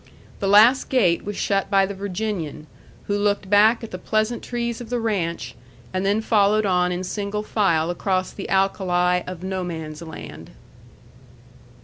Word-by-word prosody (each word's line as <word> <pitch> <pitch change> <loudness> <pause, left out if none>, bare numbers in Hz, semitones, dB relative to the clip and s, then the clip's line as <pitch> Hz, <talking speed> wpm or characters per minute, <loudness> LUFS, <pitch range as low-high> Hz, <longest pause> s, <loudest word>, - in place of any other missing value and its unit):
The 195 - -1
last 220 +6 +6
gate 190 -10 +2
was 205 0 -5
shut 195 -1 0
by 195 -1 +4
the 200 - -5
Virginian, 190 -6 -4 0.4
who 205 - -1
looked 205 -1 0
back 215 +3 +5
at 225 - -7
the 180 - -6
pleasant 215 +4 -1
trees 235 -1 -3
of 235 - -9
the 245 0 -1
ranch, 170 - -2 0.4
and 185 0 -1
then 200 +3 +1
followed 215 -1 +3
on 180 -2 +2
in 180 +1 -3
single 205 +2 -3
file 175 -7 +1
across 185 +1 -1
the 195 - -7
alkali 180 -2 +1
of 180 -1 -7
No 190 -1 -3
Man's 160 -3 -6
Land. 80 - -9
195 Hz, 160 wpm, -23 LUFS, 180-210 Hz, 0.4 s, last